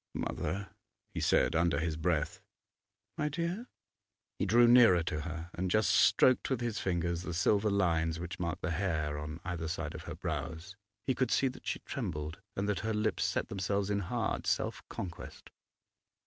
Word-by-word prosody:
'Mother!' 95 Hz, +5 st, -3 dB, 0.4 s
he -, -, -3 dB
said -, -, +3 dB
under 85 Hz, 0 st, +3 dB
his 80 Hz, -1 st, -1 dB
breath. 80 Hz, -1 st, -1 dB, 0.8 s
'My 150 Hz, -, +1 dB
dear?' 170 Hz, -, -3 dB, 0.7 s
He -, -, +1 dB
drew 120 Hz, +4 st, +6 dB
nearer 115 Hz, -8 st, +7 dB
to 75 Hz, -1 st, -2 dB
her 85 Hz, +2 st, -6 dB
and 90 Hz, +1 st, -2 dB
just 110 Hz, +3 st, +3 dB
stroked 100 Hz, +7 st, +5 dB
with 130 Hz, -3 st, 0 dB
his 120 Hz, -3 st, -2 dB
fingers 85 Hz, -2 st, -1 dB
the 90 Hz, -2 st, -4 dB
silver 100 Hz, +4 st, +3 dB
lines 85 Hz, -5 st, +1 dB
which 85 Hz, 0 st, -6 dB
marked 85 Hz, -1 st, -3 dB
the 90 Hz, -, 0 dB
hair 80 Hz, -4 st, -1 dB
on 75 Hz, +2 st, -6 dB
either 85 Hz, -3 st, -3 dB
side 80 Hz, -, -3 dB
of -, -, -8 dB
her -, -, -6 dB
brows. 85 Hz, +5 st, -4 dB, 0.3 s
He 130 Hz, -, +2 dB
could 130 Hz, 0 st, 0 dB
see 135 Hz, -, +3 dB
that 130 Hz, -, -11 dB
she -, -, -2 dB
trembled 85 Hz, -, -4 dB, 0.2 s
and 100 Hz, +1 st, -1 dB
that 105 Hz, -3 st, 0 dB
her 110 Hz, -1 st, -1 dB
lips 105 Hz, +1 st, 0 dB
set -, -, -1 dB
themselves 100 Hz, +1 st, -1 dB
in 100 Hz, -, +1 dB
hard 90 Hz, -, -2 dB
self -, -, 0 dB
conquest. 85 Hz, -3 st, -7 dB
90 Hz, 175 wpm, -32 LUFS, 80-105 Hz, 0.8 s, nearer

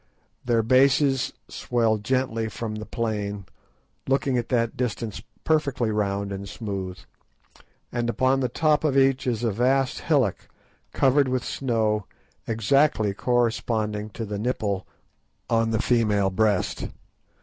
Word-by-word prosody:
Their 115 Hz, -2 st, +2 dB
bases 135 Hz, +2 st, +3 dB, 0.2 s
swell 115 Hz, -3 st, 0 dB
gently 115 Hz, -1 st, -1 dB
from 110 Hz, +1 st, -5 dB
the 110 Hz, 0 st, -6 dB
plain, 105 Hz, -3 st, -3 dB, 0.6 s
looking 135 Hz, -1 st, +1 dB
at 120 Hz, -1 st, -1 dB
that 115 Hz, -2 st, +1 dB
distance 115 Hz, -3 st, -3 dB, 0.2 s
perfectly 140 Hz, -7 st, +1 dB
round 100 Hz, -1 st, -1 dB
and 100 Hz, 0 st, -6 dB
smooth; 95 Hz, -4 st, -5 dB, 0.9 s
and 120 Hz, -1 st, -1 dB
upon 130 Hz, +2 st, +2 dB
the 130 Hz, -2 st, 0 dB
top 155 Hz, +4 st, +2 dB
of 140 Hz, -3 st, +2 dB
each 135 Hz, -1 st, +3 dB
is 120 Hz, -2 st, -1 dB
a 115 Hz, -, +1 dB
vast 130 Hz, +5 st, +1 dB
hillock 135 Hz, -, 0 dB, 0.4 s
covered 135 Hz, +1 st, +3 dB
with 130 Hz, -1 st, -1 dB
snow, 110 Hz, -5 st, 0 dB, 0.4 s
exactly 115 Hz, -1 st, +2 dB
corresponding 110 Hz, -2 st, 0 dB
to 115 Hz, +2 st, -6 dB
the 105 Hz, -1 st, -4 dB
nipple 105 Hz, -4 st, -2 dB, 0.6 s
on 115 Hz, 0 st, +3 dB
the 110 Hz, -1 st, 0 dB
female 105 Hz, -5 st, +2 dB
breast. 105 Hz, -1 st, 0 dB
115 Hz, 125 wpm, -25 LUFS, 105-130 Hz, 0.9 s, bases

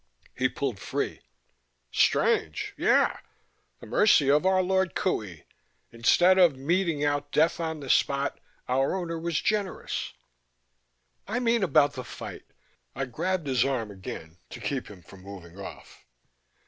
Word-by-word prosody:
He 130 Hz, 0 st, +1 dB
pulled 125 Hz, -6 st, -3 dB
free. -, -, -3 dB, 0.7 s
"Strange? 75 Hz, -1 st, +1 dB
Yea, -, -, +3 dB, 0.7 s
the -, -, -11 dB
mercy 140 Hz, -1 st, +4 dB
of 150 Hz, +6 st, +3 dB
our 190 Hz, 0 st, +3 dB
Lord 190 Hz, 0 st, +1 dB
Qohey! 100 Hz, -, -2 dB, 0.5 s
Instead 175 Hz, +11 st, +4 dB
of 170 Hz, -7 st, +5 dB
meting 165 Hz, +1 st, 0 dB
out 145 Hz, 0 st, -1 dB
death 160 Hz, +3 st, +2 dB
on 160 Hz, -2 st, -3 dB
the 140 Hz, -, -7 dB
spot, 140 Hz, +2 st, +1 dB, 0.3 s
our 135 Hz, +6 st, +1 dB
Owner 170 Hz, -3 st, -3 dB
was 165 Hz, -2 st, -1 dB
generous 210 Hz, -3 st, -2 dB, 0.5 s
" -, -, -48 dB, 0.3 s
"I 235 Hz, +4 st, -1 dB
mean 235 Hz, -2 st, +2 dB
about 155 Hz, -6 st, +3 dB
the 130 Hz, -, -6 dB
fight." -, -, -9 dB, 0.5 s
I 135 Hz, -, -2 dB
grabbed 170 Hz, +8 st, -2 dB
his 130 Hz, -4 st, +2 dB
arm 125 Hz, -6 st, -1 dB
again 90 Hz, -3 st, -9 dB
to 120 Hz, -, -9 dB
keep 125 Hz, +4 st, -3 dB
him 95 Hz, -4 st, -13 dB
from 95 Hz, +2 st, -15 dB
moving 95 Hz, -2 st, -11 dB
off. 100 Hz, -, -10 dB
140 Hz, 145 wpm, -27 LUFS, 115-175 Hz, 0.7 s, of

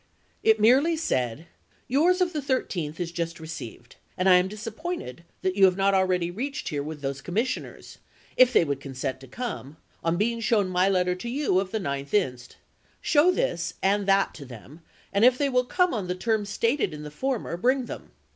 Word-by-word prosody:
It 220 Hz, 0 st, +4 dB
merely 270 Hz, +10 st, +4 dB
said: 130 Hz, -, -1 dB, 0.4 s
"Yours 345 Hz, +8 st, +3 dB
of 355 Hz, -1 st, +1 dB
the 300 Hz, -, -2 dB
13th 185 Hz, -, -2 dB
is 170 Hz, -1 st, -3 dB
just 170 Hz, -1 st, -4 dB
received, 155 Hz, -7 st, -9 dB, 0.2 s
and 185 Hz, -, +1 dB
I 180 Hz, -1 st, +8 dB
am 180 Hz, +1 st, +2 dB
disappointed 215 Hz, -, -6 dB, 0.2 s
that 185 Hz, 0 st, 0 dB
you 195 Hz, -1 st, +6 dB
have 185 Hz, 0 st, +3 dB
not 195 Hz, 0 st, +3 dB
already 185 Hz, -2 st, +1 dB
reached 275 Hz, +10 st, -4 dB
here 145 Hz, -4 st, -2 dB
with 150 Hz, 0 st, -7 dB
those 140 Hz, 0 st, -3 dB
commissioners, 225 Hz, -, -4 dB, 0.4 s
if 255 Hz, -1 st, +6 dB
they 170 Hz, -, +4 dB
would 140 Hz, -2 st, -3 dB
con 135 Hz, -1 st, -8 dB
sent 130 Hz, 0 st, -3 dB
to 135 Hz, -, -13 dB
come, 155 Hz, -, -6 dB, 0.3 s
on 165 Hz, +1 st, +1 dB
being 230 Hz, +4 st, 0 dB
shown 220 Hz, -4 st, +1 dB
my 185 Hz, +1 st, +2 dB
letter 180 Hz, -2 st, +2 dB
to 180 Hz, +6 st, -6 dB
you 260 Hz, -7 st, +1 dB
of 190 Hz, -1 st, -2 dB
the 220 Hz, -, -2 dB
9th 140 Hz, -2 st, -3 dB
inst. 125 Hz, -11 st, -1 dB, 0.4 s
Show 310 Hz, +3 st, +4 dB
that -, -, -1 dB
and 200 Hz, +1 st, +2 dB
this 195 Hz, 0 st, +5 dB
to 145 Hz, -, -10 dB
them, 130 Hz, +5 st, -12 dB, 0.3 s
and 200 Hz, +2 st, +2 dB
if 250 Hz, +1 st, +6 dB
they 285 Hz, 0 st, +1 dB
will 250 Hz, -1 st, +2 dB
come 360 Hz, +5 st, +1 dB
on 205 Hz, -6 st, -3 dB
the 180 Hz, -, -2 dB
terms 215 Hz, +1 st, -1 dB
stated 230 Hz, -, 0 dB
in 150 Hz, -, -8 dB
the 150 Hz, -, -8 dB
former, 245 Hz, -, -2 dB
bring 255 Hz, +7 st, +1 dB
them. -, -, -8 dB
195 Hz, 205 wpm, -26 LUFS, 160-250 Hz, 0.4 s, I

